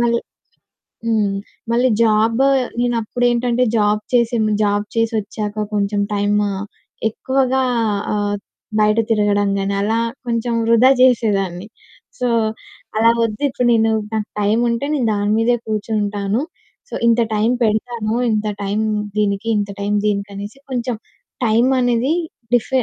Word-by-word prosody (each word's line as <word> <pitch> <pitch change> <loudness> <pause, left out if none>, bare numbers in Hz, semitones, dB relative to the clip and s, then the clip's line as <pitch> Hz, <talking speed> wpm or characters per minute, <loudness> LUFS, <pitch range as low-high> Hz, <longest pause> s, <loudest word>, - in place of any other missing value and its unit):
మళ్ళీ 235 0 +2 0.9
హ్మ్. 215 -3 +1 0.4
మళ్ళీ 245 +2 +3
జాబు 225 +3 +3 0.3
నేనప్పుడేంటంటే 240 +1 +1
జాబ్ 210 0 +2
చేసేను 230 -3 +2
జాబ్ 205 0 +1
చేసొచ్చాక 215 -2 -1
కొంచెం 205 0 0
టైము 205 0 +1 0.6
ఎక్కువగా 265 +2 0 0.5
ఆహ్, 205 0 -1 0.4
బయట 210 +1 +3
తిరగడం 205 -2 +2
గాని 195 0 -1
అలా 220 +3 +1 0.3
కొంచెం 235 0 -1
వృధా 230 +3 +6
చేసేదాన్ని. 205 -7 +2 0.5
సో, 250 - 0 0.7
అలా 230 +1 +5
వద్దు, 215 0 -3
ఇప్పుడు 250 -1 0
నేను 225 -1 +3 0.2
నాకు 215 -1 -1
టైముంటే, 235 +4 +1
నేను 255 -5 0
దాని 205 0 0
మీదే 235 +2 +3
కూర్చుంటాను. 210 0 -1 0.5
సో, - - -13
ఇంత 235 0 +4
టైం 215 +2 +2
పెడతాను, 220 0 -1 0.2
ఇంత 215 0 0 0.2
టైం 200 +2 -1 0.4
దీనికి, 205 +1 0
ఇంత 205 -1 -1
టైం 205 +1 -1
దీనికి 200 -1 0
అనేసి 205 +7 -8
కొంచెం 245 -1 -1 0.5
టైమనేది 245 +2 +2 0.4
డిఫ్ 240 -2 +2
220 Hz, 120 wpm, -19 LUFS, 205-235 Hz, 0.9 s, వృధా